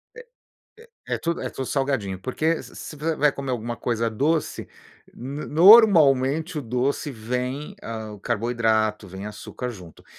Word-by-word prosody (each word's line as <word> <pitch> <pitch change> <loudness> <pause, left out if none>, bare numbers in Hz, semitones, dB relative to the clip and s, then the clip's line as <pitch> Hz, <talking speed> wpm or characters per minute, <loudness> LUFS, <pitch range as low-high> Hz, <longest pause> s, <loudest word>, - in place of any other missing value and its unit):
É - - -10 0.9
é - - -2
é - - -3
tudo 170 0 -2
é - - -3
tudo 130 - -5
salgadinho, 135 -10 -1
porque 155 +9 -1
se - - -14
se 155 - -8
você 155 +2 -2
vai 150 -1 +3
comer 135 -2 -5
alguma 120 0 -3
coisa 115 -1 -1
doce, 150 +8 -1 0.5
n 140 +5 -6
normalmente 160 - +6
o - - -2
doce 125 +4 -1
vem, 125 - -4
ah, 110 -1 -6
o 105 - -11
carboidrato, 110 -2 0
vem 95 +2 -8
açúcar 125 +3 -6
junto. 90 -8 -12
130 Hz, 160 wpm, -24 LUFS, 115-150 Hz, 0.9 s, normalmente